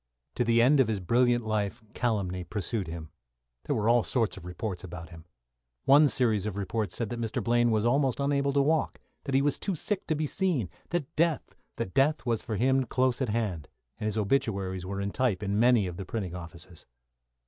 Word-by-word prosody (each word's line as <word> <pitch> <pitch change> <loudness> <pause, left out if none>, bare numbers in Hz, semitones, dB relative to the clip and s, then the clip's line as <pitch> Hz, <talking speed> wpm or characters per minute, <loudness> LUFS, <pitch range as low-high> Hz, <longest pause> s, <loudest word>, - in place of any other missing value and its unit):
To - - 0
the 115 0 +4
end 140 +3 +5
of 130 - +5
his 110 -3 -1
brilliant 120 +4 +2
life 110 -1 -2
calumny 100 -7 -1
pursued 105 +1 -3
him. 80 -1 -7 0.5
There - - 0
were 105 0 0
all 120 +1 +5
sorts 115 -4 0
of 95 - -11
reports 90 0 -5
about 85 -2 -8
him. 80 -2 -13 0.6
One 145 +2 +7
series 110 -7 +1
of 105 - -4
reports 100 -2 -2
said 115 -3 -2
that 120 -1 -4
Mr. 115 -1 -2
Blaine 120 0 +3
was 110 -1 +1
almost 135 +2 +2
unable 140 0 +1
to 140 0 +3
walk; 155 +2 0 0.3
that 135 -2 -1
he 135 - +4
was 145 -1 +1
too 195 - -2
sick 200 +5 -2
to 155 - +1
be 155 +1 -1
seen; 150 - -1 0.2
that 165 -3 -3
death 150 - 0
was 115 -3 0
for 110 - -4
him 130 +4 +2
close 130 +2 +1
at 130 - 0
hand, 105 -8 -2 0.3
and 110 - -2
his 110 0 -2
obituaries 100 -5 0
were 100 +1 -4
in 100 0 -2
type 115 -6 0
in 100 +1 0
many 120 -3 +5
of 90 -1 -5
the 95 - -5
printing 95 -3 -4
offices. 85 0 -10
115 Hz, 205 wpm, -28 LUFS, 95-130 Hz, 0.6 s, One